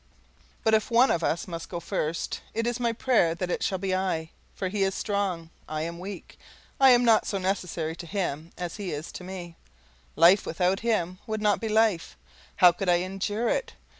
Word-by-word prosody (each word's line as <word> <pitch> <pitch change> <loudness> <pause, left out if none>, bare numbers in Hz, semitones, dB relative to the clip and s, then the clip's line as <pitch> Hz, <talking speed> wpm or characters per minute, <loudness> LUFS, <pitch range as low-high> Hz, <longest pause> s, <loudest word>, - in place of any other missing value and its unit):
But 220 - +3
if 220 -1 +2
one 240 +3 +5
of 170 - 0
us 170 - -1
must 165 -2 -6
go 175 - -4
first, 170 -2 -3
it 230 +1 0
is 240 +1 -1
my 235 -1 +1
prayer 225 -8 +2
that 180 +1 -3
it - - -1
shall 190 - 0
be 190 0 -2
I; 180 -4 -1 0.2
for 190 - -2
he 200 +2 -2
is 195 0 +1
strong, 190 -5 -2 0.2
I 155 0 -2
am 170 +1 -5
weak, 190 0 -9 0.4
I 270 -1 +7
am 245 -1 +6
not 225 -2 +4
so 200 - -1
necessary 180 -4 -2
to 170 - -8
him 165 -4 -3
as 175 +1 -5
he 200 -4 -4
is 150 +2 -5
to - - -8
me 180 -2 -8 0.6
life 170 +6 +6
without 180 +4 0
him 185 -6 -1
would 220 0 -2
not 210 0 +2
be 225 - -2
life; 215 -5 +1 0.4
how 180 -1 +7
could 180 +2 -3
I 175 - +6
endure 205 +4 -2
it? - - -1
190 Hz, 205 wpm, -27 LUFS, 170-215 Hz, 0.6 s, I